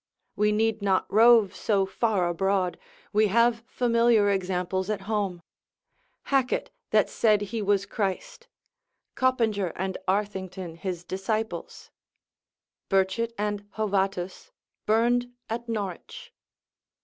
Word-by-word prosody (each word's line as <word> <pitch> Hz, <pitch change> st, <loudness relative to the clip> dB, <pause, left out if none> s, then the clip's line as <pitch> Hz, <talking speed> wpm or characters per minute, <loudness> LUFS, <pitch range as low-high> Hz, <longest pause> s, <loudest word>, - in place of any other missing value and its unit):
We 210 Hz, 0 st, +2 dB
need 220 Hz, 0 st, +1 dB
not 195 Hz, -2 st, +2 dB
rove 220 Hz, -3 st, +6 dB
so 195 Hz, 0 st, +1 dB
far 190 Hz, -1 st, 0 dB
abroad, 185 Hz, +1 st, 0 dB, 0.3 s
we 215 Hz, +1 st, +4 dB
have 230 Hz, +2 st, +2 dB
familiar 235 Hz, -4 st, +3 dB
examples 185 Hz, 0 st, -1 dB
at 210 Hz, -2 st, -2 dB
home: 195 Hz, -4 st, -2 dB, 0.8 s
Hackett 270 Hz, -, 0 dB, 0.2 s
that -, -, +3 dB
said 210 Hz, -2 st, +2 dB
he 215 Hz, +2 st, -3 dB
was 200 Hz, -1 st, +1 dB
Christ; 200 Hz, -, -4 dB, 0.7 s
Coppinger 225 Hz, -8 st, +1 dB
and 190 Hz, +1 st, -3 dB
Arthington 190 Hz, -3 st, -2 dB
his 180 Hz, -2 st, -4 dB
disciples; 215 Hz, +5 st, -4 dB, 1.0 s
Burchet 195 Hz, +4 st, +1 dB
and 205 Hz, 0 st, -3 dB
Hovatus, 195 Hz, -, -1 dB, 0.4 s
burned 240 Hz, +3 st, +2 dB, 0.2 s
at 235 Hz, +1 st, -4 dB
Norwich. 200 Hz, -5 st, -5 dB
205 Hz, 105 wpm, -26 LUFS, 190-225 Hz, 1.0 s, rove